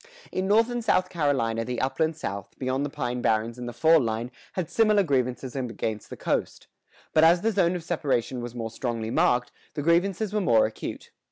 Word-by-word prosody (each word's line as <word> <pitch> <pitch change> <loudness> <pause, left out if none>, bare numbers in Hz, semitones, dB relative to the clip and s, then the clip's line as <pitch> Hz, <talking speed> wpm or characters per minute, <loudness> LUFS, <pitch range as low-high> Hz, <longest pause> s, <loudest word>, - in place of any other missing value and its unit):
In 185 +1 -1
North 225 +4 +4
and 240 -1 -2
South 185 -4 +2
Carolina 135 -9 0
the 125 0 -3
upland 150 +5 0
South, 100 -9 -6
beyond 130 +1 -1
the 145 - -2
pine 125 -4 -3
barrens 115 +2 0
and 120 0 -5
the - - -5
fall 160 +7 +5
line, 115 -1 -2 0.2
had 185 -4 -2
similar 215 0 +3
grievances 130 -4 -1
against 115 -4 -3
the - - -8
coast; - - -2 0.5
but 155 - +5
as 170 +2 +6
the 225 - +1
zone 185 -3 +2
of 175 - -5
separation 140 -7 -1
was 120 0 -7
more 115 -2 -4
strongly 115 -2 -3
marked, 125 0 +2 0.2
the 145 - -2
grievances 185 +5 +1
were 210 - +1
more 115 - +4
acute. 110 - -6
135 Hz, 195 wpm, -26 LUFS, 120-175 Hz, 0.5 s, as